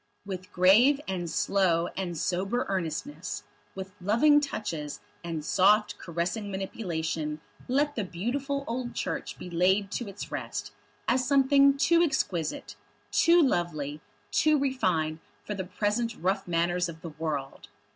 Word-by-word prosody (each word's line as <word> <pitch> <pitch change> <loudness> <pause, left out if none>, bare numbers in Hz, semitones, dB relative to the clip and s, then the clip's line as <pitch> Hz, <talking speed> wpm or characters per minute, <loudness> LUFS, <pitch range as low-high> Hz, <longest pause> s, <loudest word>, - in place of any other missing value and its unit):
With 185 0 -6
grave 215 +11 +5
and 180 -3 -3
slow 175 -2 +2
and 175 -3 -3
sober 195 +9 0
earnestness, 190 - -3 0.3
with 190 0 -7
loving 235 +10 +5
touches 170 - -4 0.2
and 165 -3 -4
soft 205 +5 +3
caressing 175 +5 -3
manipulation 165 -6 -3 0.3
let 290 +3 +1
the 215 - -1
beautiful 270 +10 -2
old 240 +1 -4
Church - - -3
be - - -8
laid 190 +3 +2
to 240 - -3
its 200 0 -7
rest, - - -4 0.4
as 255 0 +2
something 275 0 +5
too 335 +4 +4
exquisite, 180 - -1 0.4
too 340 0 +5
lovely, 155 - -1 0.3
too 310 0 +4
refined 180 - 0 0.2
for 210 - -4
the 190 -2 -4
present 210 +5 -1
rough 190 +3 -1
manners 175 +1 +1
of 165 -1 -9
the 170 - -5
world! 150 -3 -4
190 Hz, 135 wpm, -28 LUFS, 170-245 Hz, 0.4 s, grave